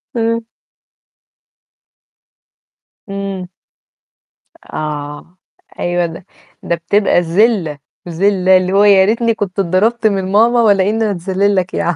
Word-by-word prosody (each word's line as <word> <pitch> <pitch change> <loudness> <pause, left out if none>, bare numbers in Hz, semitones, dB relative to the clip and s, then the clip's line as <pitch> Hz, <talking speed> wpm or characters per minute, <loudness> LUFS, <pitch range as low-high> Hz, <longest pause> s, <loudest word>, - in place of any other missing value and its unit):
امم. 230 0 -1 2.6
إمم. 195 -2 -5 1.3
آه، 150 +3 -6 0.4
أيوه 175 0 0
ده 165 +2 -8 0.4
ده 170 - -1
بتبقى 175 +2 +1
ذلّة، 175 -3 +1 0.3
ذلّة 190 +1 +2
اللي 185 0 -1
هو 200 +1 +4
يا 195 -2 +5
ريتني 230 +2 +1
كنت 200 -3 -4
اتضربت 210 +6 +1
من 190 -2 -2
ماما 235 +4 +3
والّا 200 -3 +3
إن 225 +1 -1
أنا 215 - +1
أتذلّل 195 +2 -1
لك 185 -1 -1
ياعم. 175 - -1
195 Hz, 115 wpm, -15 LUFS, 175-210 Hz, 2.6 s, يا